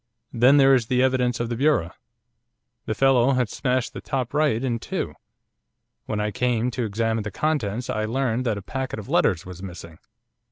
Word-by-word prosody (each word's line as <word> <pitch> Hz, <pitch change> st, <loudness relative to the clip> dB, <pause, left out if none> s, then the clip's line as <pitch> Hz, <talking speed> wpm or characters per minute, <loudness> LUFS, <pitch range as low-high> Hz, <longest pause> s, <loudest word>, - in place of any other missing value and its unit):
Then 125 Hz, +4 st, +5 dB
there 135 Hz, -1 st, +6 dB
is 120 Hz, -4 st, +2 dB
the 125 Hz, +1 st, +2 dB
evidence 125 Hz, -2 st, +1 dB
of 120 Hz, -1 st, -2 dB
the 120 Hz, -, -2 dB
bureau. 130 Hz, -, +2 dB, 1.0 s
The 110 Hz, -, -1 dB
fellow 135 Hz, +1 st, +4 dB
had 125 Hz, -4 st, +1 dB
smashed 130 Hz, -2 st, -1 dB
the -, -, -7 dB
top 130 Hz, -2 st, -3 dB
right 145 Hz, -6 st, +1 dB
in 120 Hz, -3 st, -1 dB
two. -, -, -4 dB, 0.9 s
When 105 Hz, -, -2 dB
I 105 Hz, 0 st, -1 dB
came 125 Hz, +2 st, 0 dB
to 125 Hz, -1 st, -2 dB
examine 110 Hz, +1 st, -1 dB
the 105 Hz, -, -4 dB
contents 125 Hz, -6 st, -1 dB
I 110 Hz, 0 st, -1 dB
learned 125 Hz, +1 st, -1 dB
that 110 Hz, -3 st, 0 dB
a 100 Hz, -, -7 dB
packet 130 Hz, +5 st, -4 dB
of 105 Hz, -, -8 dB
letters 90 Hz, -6 st, +2 dB
was 90 Hz, -1 st, -9 dB
missing. 85 Hz, -3 st, -9 dB
120 Hz, 190 wpm, -24 LUFS, 110-130 Hz, 1.0 s, there